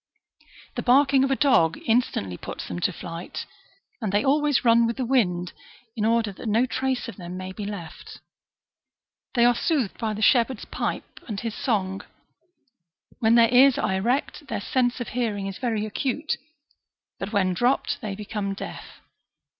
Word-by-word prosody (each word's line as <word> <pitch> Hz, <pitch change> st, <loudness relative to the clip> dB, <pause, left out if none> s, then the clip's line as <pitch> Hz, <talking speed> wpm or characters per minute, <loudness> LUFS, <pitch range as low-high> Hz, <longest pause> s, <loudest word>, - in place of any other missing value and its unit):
The -, -, -3 dB
barking 270 Hz, +1 st, +4 dB
of 270 Hz, -, +1 dB
a 270 Hz, -, +2 dB
dog 185 Hz, -, +3 dB
instantly 225 Hz, -, +1 dB
puts -, -, -7 dB
them 85 Hz, -, -4 dB
to -, -, +1 dB
flight, 170 Hz, 0 st, -7 dB, 0.6 s
and 215 Hz, -4 st, -1 dB
they 205 Hz, +1 st, +1 dB
always 290 Hz, -1 st, +2 dB
run 230 Hz, 0 st, +5 dB
with 230 Hz, -, -3 dB
the 260 Hz, -, -1 dB
wind, 180 Hz, -9 st, +1 dB, 0.4 s
in 215 Hz, -2 st, -1 dB
order 225 Hz, -2 st, +2 dB
that 215 Hz, +4 st, -6 dB
no 225 Hz, +4 st, +3 dB
trace 260 Hz, 0 st, -2 dB
of 230 Hz, -, -8 dB
them 180 Hz, -1 st, -7 dB
may 185 Hz, 0 st, -6 dB
be 205 Hz, +2 st, -6 dB
left. 200 Hz, -6 st, -8 dB, 1.2 s
They 235 Hz, -1 st, +5 dB
are 245 Hz, -, +6 dB
soothed 250 Hz, -, -1 dB
by 220 Hz, -2 st, -1 dB
the 215 Hz, -, -3 dB
shep 235 Hz, -1 st, +5 dB
herd's 260 Hz, -5 st, -7 dB
pipe -, -, -4 dB
and 210 Hz, -4 st, -4 dB
his 230 Hz, -2 st, -4 dB
song;''^ 195 Hz, -6 st, -1 dB, 1.2 s
when 225 Hz, 0 st, +4 dB
their 230 Hz, 0 st, +5 dB
ears 260 Hz, +1 st, +7 dB
are 200 Hz, -, 0 dB
erect, 245 Hz, +8 st, -1 dB
their -, -, -3 dB
sense 245 Hz, +4 st, 0 dB
of 245 Hz, -, -4 dB
hearing 220 Hz, -5 st, -2 dB
is 195 Hz, -1 st, -5 dB
very 225 Hz, -4 st, -1 dB
acute, 270 Hz, +7 st, -2 dB, 0.8 s
but 195 Hz, +1 st, -4 dB
when 190 Hz, -4 st, +2 dB
dropped, 245 Hz, +8 st, +1 dB
they 205 Hz, -2 st, -4 dB
become 205 Hz, -1 st, -4 dB
deaf. -, -, -9 dB
225 Hz, 170 wpm, -25 LUFS, 195-250 Hz, 1.2 s, ears